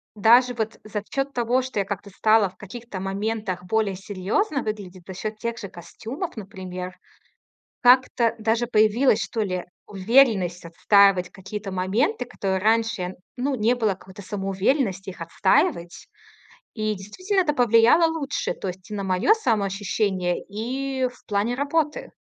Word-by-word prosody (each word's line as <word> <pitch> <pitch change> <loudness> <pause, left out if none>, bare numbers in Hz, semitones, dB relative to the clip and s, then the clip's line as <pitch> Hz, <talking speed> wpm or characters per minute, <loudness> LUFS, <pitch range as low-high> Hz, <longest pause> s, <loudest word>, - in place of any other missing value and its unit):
даже 240 +4 +5
вот 220 -2 -4
за 210 -1 -5
счёт 275 0 -2
того, 245 +1 +1
что 255 -4 -4
я 200 - 0
как-то 200 +1 -5
стала 215 +1 +3
в 185 - -23
каких-то 215 0 -8
моментах 195 -1 -3
более 210 0 0
серьёзно 205 - -1
выглядеть, 195 -4 -6
за 190 - -6
счёт 215 +3 -5
тех 235 +1 -4
же 205 - -6
костюмов, 235 - -7
например. 185 -3 -7 0.9
Как-то 250 -2 +4
даже 225 +2 +1
появилась, 220 +3 +3
что 225 - -2
ли, 185 -3 -2 0.2
уверенность 195 -4 +3
отстаивать 190 +2 +4
какие-то 195 +1 -7
моменты, 205 - 0
который 195 -5 -2
раньше, 220 -3 +1 0.2
ну, 270 +3 -1
не 235 0 +2
было 225 -4 +1
какой-то 190 +1 -13
самоуверенности 195 +1 -1
их 180 - -12
отстаивать. 185 - 0 0.7
И 215 -2 -1
действительно, 370 - -2
это 330 -5 +1
повлияло 240 +6 +5
лучше, 320 -3 -2
то 195 - -5
есть 185 +1 -8
и - - -4
на 200 - -3
моё 190 - +3
самоощущение, 200 - -1
и 260 +5 -2
в 245 - -19
плане 210 +3 0
работы. 295 +3 -1
215 Hz, 145 wpm, -24 LUFS, 190-245 Hz, 0.9 s, даже